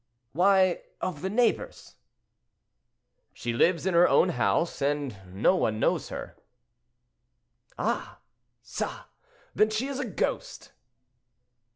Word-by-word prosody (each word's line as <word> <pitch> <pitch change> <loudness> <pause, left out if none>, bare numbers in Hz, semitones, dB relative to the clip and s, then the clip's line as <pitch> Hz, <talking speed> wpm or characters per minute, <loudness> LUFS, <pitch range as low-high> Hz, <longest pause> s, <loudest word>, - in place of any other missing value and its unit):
"Why, 185 - +3 0.2
of 165 -6 -4
the 190 - -2
neighbors." 230 +3 0 1.4
"She 120 - -4
lives 170 +9 +2
in 190 - +1
her 170 +1 +6
own 180 - +4
house, 170 -2 0
and 140 -4 -1 0.2
no 100 - +3
one 110 -11 0
knows - - 0
her." - - -7 1.4
"Ah! - - -2 0.5
ça! - - -5 0.5
then 215 +2 +3
she 215 +4 -1
is 275 -1 -4
a 270 - -1
ghost!" 205 - -3
180 Hz, 110 wpm, -27 LUFS, 145-200 Hz, 1.4 s, her